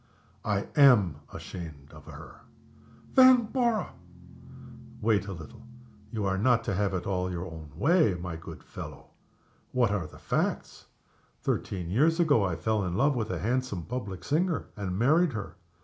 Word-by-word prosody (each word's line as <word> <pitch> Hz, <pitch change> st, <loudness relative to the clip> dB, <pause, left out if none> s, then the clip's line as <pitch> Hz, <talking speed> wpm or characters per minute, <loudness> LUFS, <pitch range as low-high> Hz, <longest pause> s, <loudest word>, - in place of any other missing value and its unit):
"I 100 Hz, -2 st, 0 dB
am 115 Hz, -, +6 dB
ashamed 75 Hz, -6 st, -9 dB
of -, -, -13 dB
her." -, -, -11 dB, 0.8 s
"Vanborough!" 245 Hz, -3 st, +4 dB, 1.1 s
"Wait 105 Hz, -2 st, +1 dB
a -, -, -4 dB
little! 80 Hz, -6 st, -10 dB, 0.5 s
you 110 Hz, -3 st, -2 dB
are 95 Hz, 0 st, 0 dB
not 120 Hz, +2 st, +3 dB
to -, -, -2 dB
have 95 Hz, 0 st, 0 dB
it 90 Hz, -, -3 dB
all 90 Hz, -2 st, -1 dB
your 90 Hz, 0 st, -4 dB
own 80 Hz, -4 st, -9 dB
way, 145 Hz, -, +3 dB
my 90 Hz, -1 st, -5 dB
good 80 Hz, -, -10 dB
fellow. -, -, -10 dB, 0.6 s
What 120 Hz, -4 st, +2 dB
are 95 Hz, -6 st, -1 dB
the -, -, -14 dB
facts? -, -, -2 dB, 0.6 s
Thirteen 90 Hz, -3 st, -2 dB
years 160 Hz, -, +3 dB
ago 145 Hz, -11 st, +4 dB
I 90 Hz, -4 st, 0 dB
fell 105 Hz, +5 st, 0 dB
in 90 Hz, -1 st, -2 dB
love 135 Hz, +6 st, +3 dB
with 110 Hz, -3 st, -2 dB
a -, -, -2 dB
handsome 125 Hz, -5 st, -1 dB
public 100 Hz, -6 st, -5 dB
singer, 165 Hz, +3 st, 0 dB
and 95 Hz, -4 st, -3 dB
married 155 Hz, -, +3 dB
her. 110 Hz, -3 st, -5 dB
105 Hz, 155 wpm, -28 LUFS, 90-135 Hz, 1.1 s, am